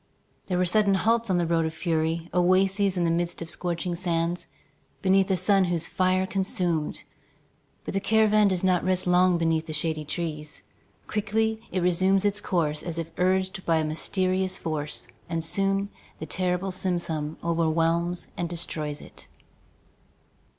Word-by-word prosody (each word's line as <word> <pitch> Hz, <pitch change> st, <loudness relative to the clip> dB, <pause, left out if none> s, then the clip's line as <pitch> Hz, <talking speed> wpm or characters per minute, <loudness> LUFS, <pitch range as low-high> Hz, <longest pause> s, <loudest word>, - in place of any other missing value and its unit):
There 180 Hz, -, 0 dB
were 180 Hz, -, +2 dB
sudden 200 Hz, +1 st, +3 dB
halts 230 Hz, +3 st, +1 dB
on 185 Hz, -, +2 dB
the 175 Hz, -, +1 dB
road 165 Hz, 0 st, +2 dB
of 160 Hz, -, -6 dB
fury, 165 Hz, 0 st, -1 dB
oases 190 Hz, +2 st, +3 dB
in 175 Hz, -, +2 dB
the 165 Hz, -, +2 dB
midst 170 Hz, +1 st, -1 dB
of 165 Hz, 0 st, -5 dB
scorching 175 Hz, 0 st, -2 dB
sands, 170 Hz, 0 st, -1 dB, 0.6 s
beneath 190 Hz, 0 st, +4 dB
a 190 Hz, -, +3 dB
sun 195 Hz, +1 st, +3 dB
whose 170 Hz, -2 st, -1 dB
fire 185 Hz, 0 st, +1 dB
consumed. 185 Hz, -5 st, -1 dB, 0.8 s
But -, -, -4 dB
the 195 Hz, -, +1 dB
caravan 215 Hz, 0 st, +4 dB
does 185 Hz, -2 st, 0 dB
not 185 Hz, -2 st, +3 dB
rest 185 Hz, 0 st, +1 dB
long 180 Hz, 0 st, +4 dB
beneath 165 Hz, -1 st, 0 dB
the 155 Hz, -, -5 dB
shady 155 Hz, 0 st, -1 dB
trees. 150 Hz, -1 st, -5 dB, 0.4 s
Quickly 220 Hz, +1 st, -1 dB
it 185 Hz, -2 st, -1 dB
resumes 185 Hz, +3 st, +3 dB
its 205 Hz, 0 st, +1 dB
course 155 Hz, -4 st, 0 dB
as 170 Hz, -2 st, -5 dB
if 165 Hz, 0 st, -4 dB
urged 190 Hz, +1 st, +1 dB
by 165 Hz, -1 st, +2 dB
a 160 Hz, -, +1 dB
mysterious 185 Hz, +4 st, 0 dB
force, 150 Hz, -2 st, -3 dB, 0.2 s
and 165 Hz, -1 st, -1 dB
soon 195 Hz, +3 st, +1 dB, 0.3 s
the 160 Hz, -, -6 dB
terrible 180 Hz, +2 st, -1 dB
simoom 170 Hz, -4 st, -2 dB
overwhelms 170 Hz, +1 st, 0 dB
and 175 Hz, -1 st, -3 dB
destroys 155 Hz, -3 st, -4 dB
it. -, -, -12 dB
180 Hz, 155 wpm, -26 LUFS, 165-190 Hz, 0.8 s, beneath